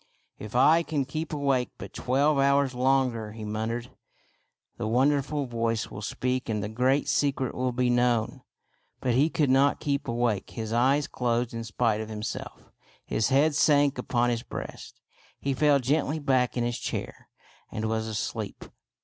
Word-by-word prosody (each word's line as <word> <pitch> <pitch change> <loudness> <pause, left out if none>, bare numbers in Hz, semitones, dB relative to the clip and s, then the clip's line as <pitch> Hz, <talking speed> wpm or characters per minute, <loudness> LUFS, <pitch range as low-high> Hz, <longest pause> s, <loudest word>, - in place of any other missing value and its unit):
" - - -44
If 110 - -11
I 160 +6 +6
can 150 -4 -2
keep 155 +4 -4
awake 140 -4 0
but - - -9
twelve 140 +3 +1
hours 140 -1 +3
longer," 125 -4 +1
he 110 -1 -7
muttered, 110 +3 -3 0.4
" - - -46
the - - -2
wonderful 140 +4 +1
voice 115 -2 -2
will 100 - -7
speak 125 +3 -2
and 105 -2 -1
the 105 - -3
great 130 +5 +1
secret 135 -3 0
will 125 0 -1
be 125 +1 0
known." 120 -2 +1 0.6
But 125 - 0
he 140 +6 +3
could 150 -4 +1
not 135 +2 +3
keep 140 -1 -2
awake. 115 -4 0
His 110 -1 -5
eyes 135 +5 +3
closed 120 -1 -1
in 115 0 -4
spite 110 0 0
of 110 - -6
himself; 105 0 -6 0.3
his 110 - 0
head 145 +3 +3
sank 145 -2 +3
upon 120 -1 +1
his 115 -1 -1
breast; - - -8 0.4
he 140 - -1
fell 145 +1 +4
gently 145 +3 0
back 130 -4 +1
in 120 - +1
his 120 0 -2
chair, - - -5 0.4
and 110 +1 -2
was 110 0 -1
asleep. 110 -2 -4
125 Hz, 170 wpm, -27 LUFS, 115-140 Hz, 0.6 s, I